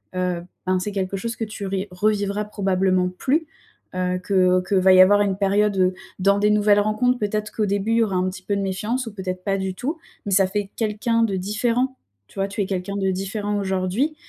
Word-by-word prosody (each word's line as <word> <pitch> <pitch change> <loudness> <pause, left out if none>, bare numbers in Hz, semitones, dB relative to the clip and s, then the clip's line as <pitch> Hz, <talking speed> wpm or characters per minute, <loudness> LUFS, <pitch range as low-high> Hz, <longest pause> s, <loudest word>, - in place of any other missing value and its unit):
heu, 180 -1 -1 0.2
ben, 185 0 +1
c'est 205 +3 -3
quelque 195 0 -2
chose 230 +4 -4
que 225 - -4
tu 210 -1 -7
ri 195 +1 -2
revivras 205 +2 0
probablement 190 -3 +1
plus, 270 - 0 0.5
heu, 180 0 0
que 185 -2 +3
qu'il 195 - +2
va 190 0 +6
y 185 - +8
avoir 205 +2 +6
une 195 -2 0
période, 195 -2 +2 0.3
dans 200 +2 +3
des 210 +1 +3
nouvelles 210 -1 +4
rencontres, 220 +4 +1
peut-être, 210 0 -2
qu'au 215 - 0
début 200 +2 -1
il - - +3
y 230 - +4
aura 200 -4 -2
un 185 0 +1
petit 185 0 -9
peu 205 - -1
de 200 - -1
méfiance 210 +7 -2
ou 225 - -7
peut-être 185 -2 -5
pas 195 0 0
du 190 -1 -3
tout. 295 - -3 0.3
Mais 200 - -3
ça 195 0 +4
fait 200 +1 -3
quelqu'un 225 +1 0
de 205 -4 0
différent, 230 +7 -1 0.3
tu - - -11
vois? 195 - +1
Tu 205 +1 -3
es - - +1
quelqu'un 190 +1 -3
de 190 -1 +1
différent 205 +2 -2
aujourd'hui 190 +10 -1
200 Hz, 225 wpm, -22 LUFS, 185-210 Hz, 0.5 s, y